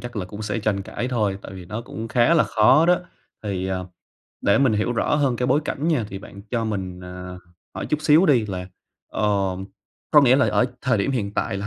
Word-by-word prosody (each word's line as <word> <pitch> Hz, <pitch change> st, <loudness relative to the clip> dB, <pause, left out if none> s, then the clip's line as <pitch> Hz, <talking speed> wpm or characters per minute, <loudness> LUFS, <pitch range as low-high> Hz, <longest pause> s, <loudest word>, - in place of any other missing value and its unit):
chắc 120 Hz, -2 st, -8 dB
là 95 Hz, -, -2 dB
cũng 100 Hz, +4 st, -8 dB
sẽ 105 Hz, +1 st, -2 dB
tranh 100 Hz, -2 st, -1 dB
cãi 125 Hz, +5 st, -4 dB
thôi, 105 Hz, -5 st, 0 dB
tại -, -, -9 dB
vì 90 Hz, -2 st, -9 dB
nó 105 Hz, +6 st, -5 dB
cũng 115 Hz, -1 st, -7 dB
khá 125 Hz, +8 st, +3 dB
là 160 Hz, -, +4 dB
khó 130 Hz, +9 st, +4 dB
đó. 180 Hz, 0 st, +4 dB, 0.4 s
Thì, 95 Hz, -3 st, -3 dB
à, 95 Hz, -1 st, -1 dB, 0.6 s
để 100 Hz, -, +3 dB
mình 135 Hz, -4 st, +3 dB
hiểu 105 Hz, +3 st, 0 dB
rõ 120 Hz, -, +1 dB
hơn 140 Hz, -5 st, +1 dB
cái 125 Hz, -, -1 dB
bối 135 Hz, +4 st, +3 dB
cảnh 150 Hz, +3 st, -2 dB
nha, 150 Hz, -9 st, +1 dB
thì 95 Hz, -, -6 dB
bạn 100 Hz, 0 st, -12 dB
cho 115 Hz, -2 st, 0 dB
mình, 95 Hz, -4 st, -4 dB
ờ, 90 Hz, 0 st, -8 dB, 0.4 s
hỏi -, -, -4 dB
chút 150 Hz, 0 st, -1 dB
xíu 160 Hz, +5 st, +5 dB
đi, 120 Hz, -7 st, +3 dB
là, 90 Hz, -2 st, -5 dB, 0.4 s
ờ, -, -, -4 dB, 0.9 s
có 150 Hz, -, +7 dB
nghĩa 130 Hz, -1 st, +5 dB
là 140 Hz, -, +3 dB
ở -, -, +3 dB, 0.2 s
thời 125 Hz, -5 st, +2 dB
điểm 100 Hz, -, 0 dB
hiện 105 Hz, -6 st, -2 dB
tại 105 Hz, -4 st, -1 dB
là 100 Hz, -, -4 dB
110 Hz, 235 wpm, -23 LUFS, 100-130 Hz, 0.9 s, có